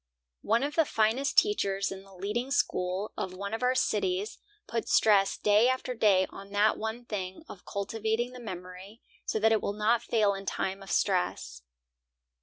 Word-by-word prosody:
One 230 +4 +1
of 290 +1 -2
the 325 - +4
finest 230 +1 0
teachers 200 - +2
in 195 0 -7
the 195 0 -18
leading 210 +7 -3
school 195 -6 0
of 185 -1 -4
one 200 +2 -5
of 225 - -3
our 250 +1 +2
cities 205 -4 0 0.3
puts 230 0 -3
stress 200 -3 +4
day 210 +4 +4
after 260 0 -1
day 200 -5 +4
on 195 0 -10
that 210 +1 +3
one 220 +2 -5
thing 190 0 -5
of 185 - -12
cultivating 220 +4 -2
the 250 - -10
memory 185 0 -9 0.2
so - - 0
that 220 +1 +3
it 220 - +3
will 200 - -2
not 220 +3 +2
fail 215 -4 +2
in 195 0 -8
time 190 +1 -2
of 195 - -11
stress. 175 - 0
210 Hz, 180 wpm, -29 LUFS, 195-235 Hz, 0.3 s, the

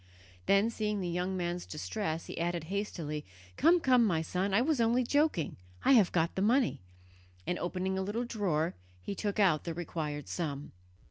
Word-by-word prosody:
Then, 200 +4 +4
seeing 210 -2 -1
the 180 - -2
young 180 +2 -1
man's 175 0 -2
distress, 165 +1 -3
he - - -6
added 170 -1 -1
hastily: 165 -7 -3 0.3
"Come 335 +5 +5
come, 255 -6 +4
my 170 -7 +1
son, 185 +4 -1
I 195 - +4
was 275 0 +2
only 235 +2 +3
joking, 285 - +1 0.3
I - - +6
have 220 -9 +6
got 165 -1 +1
the 190 - -2
money," 235 - +2 0.6
and, 180 - -1
opening 185 +2 -2
a - - 0
little 210 +5 -2
drawer, 180 -9 0 0.3
he - - -3
took 205 +1 -2
out 180 -7 +4
the 165 -2 -4
required 155 -4 -4
sum. 145 -4 -4
190 Hz, 180 wpm, -31 LUFS, 170-225 Hz, 0.6 s, I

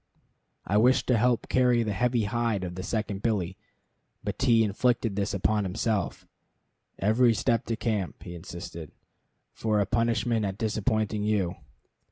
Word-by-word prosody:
I 100 - +1
wished 125 +4 +4
to 125 - +4
help 120 0 +2
carry 125 -2 +3
the 105 -2 -2
heavy 120 +2 +1
hide 115 -2 -1
of 90 -1 -4
the 95 - -5
second 105 -1 -3
billy; 100 -5 -1 0.7
but - - -4
T 120 -4 +4
inflicted 115 +1 +1
this 100 -1 -1
upon 105 +2 +1
himself, 100 +2 -2 0.7
"every 115 +4 +3
step 115 +1 +1
to 115 - 0
camp," 110 -5 -2
he 90 - -8
insisted, 85 -2 -8 0.6
"for 105 -2 +1
punishment 115 0 +1
at 95 -1 -2
disappointing 110 0 0
you." 105 -5 +1
110 Hz, 145 wpm, -27 LUFS, 100-115 Hz, 0.7 s, wished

